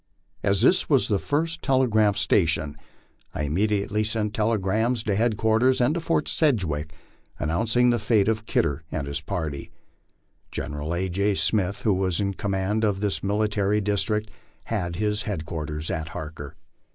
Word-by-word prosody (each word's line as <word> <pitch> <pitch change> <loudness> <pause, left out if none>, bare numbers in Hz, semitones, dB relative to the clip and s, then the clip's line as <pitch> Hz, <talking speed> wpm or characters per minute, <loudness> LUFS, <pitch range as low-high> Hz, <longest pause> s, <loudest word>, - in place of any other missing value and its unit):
As 100 -1 +1
this 185 - +4
was 140 -4 +3
the 100 -2 +2
first 160 - -1
tele 130 -1 +3
graph 105 -3 +3
station, 80 -8 +2 0.6
I - - -2
immediately 105 +6 0
sent 110 -1 -2
telegrams 110 +2 +1
to 100 -3 0
headquarters 110 +3 +2
and 125 +4 +3
to 170 - -1
Fort 165 0 0
Sedg 140 - +2
wick, 75 -1 -3 0.5
announcing 115 +10 +2
the 120 - +1
fate 105 -1 +2
of 110 0 -1
Kidder 70 +2 0
and 70 - -2
his 70 +2 -3
party. 80 -5 -4 0.8
General 75 +3 -4
A. 95 +2 -1
J. 100 +3 0
Smith, 105 +4 0
who 105 - +3
was 95 -1 0
in 100 -1 0
command 100 +2 -1
of 100 -3 +1
this 100 -1 -1
military 105 0 +1
district, 105 +1 -1 0.3
had 90 -6 -3
his 105 +2 0
headquarters 80 -5 -4
at 80 0 -3
Harker. 75 -3 -7
105 Hz, 155 wpm, -25 LUFS, 85-110 Hz, 0.8 s, this